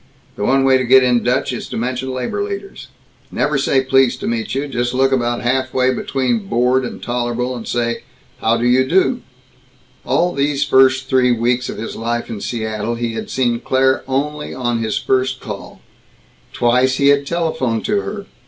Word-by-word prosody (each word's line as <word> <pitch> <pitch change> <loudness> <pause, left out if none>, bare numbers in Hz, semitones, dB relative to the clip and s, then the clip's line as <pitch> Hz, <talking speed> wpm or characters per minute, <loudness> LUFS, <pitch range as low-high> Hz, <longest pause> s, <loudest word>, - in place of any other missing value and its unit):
"The - - -4
one 135 +5 +3
way 135 -1 +4
to - - 0
get 130 +1 +6
in 125 -2 +3
Dutch 125 +2 0
is 120 - -6
to - - -5
mention 130 +3 -2
labor 130 - -3
leaders. 400 -1 -7 0.4
"Never 145 -1 0
say 135 0 +2
'Pleased 135 -1 +2
to - - -3
meet 115 +1 -2
you.' 140 +2 -1
Just 120 -2 -2
look 135 +1 +3
about 120 -2 0
halfway 130 +1 +1
between 125 -6 -1
bored 125 +4 +2
and 125 - -7
tol'able 120 +1 -2
and 115 - -7
say, 120 -1 -1 0.4
'How 115 +1 +2
do 120 - -1
you 125 +2 +4
do?'" 190 - +2 0.8
All 175 +1 +1
these 140 0 0
first 130 -1 +4
three 130 -1 +3
weeks 120 +1 0
of - - -6
his 115 - -6
life 120 +1 -3
in 105 -3 -6
Seattle, 110 0 -3
he 115 -1 -3
had - - -5
seen 120 -3 0
Claire 130 +1 +1
only 150 +3 -2
on 120 -2 -1
his 110 -1 -1
first 130 0 0
call. 105 -2 -8 0.7
Twice 125 +2 +2
he 140 +1 +3
had 140 0 +3
telephoned 155 -9 -1
to 205 -1 +1
her. 205 -1 -6
130 Hz, 185 wpm, -18 LUFS, 120-135 Hz, 0.8 s, get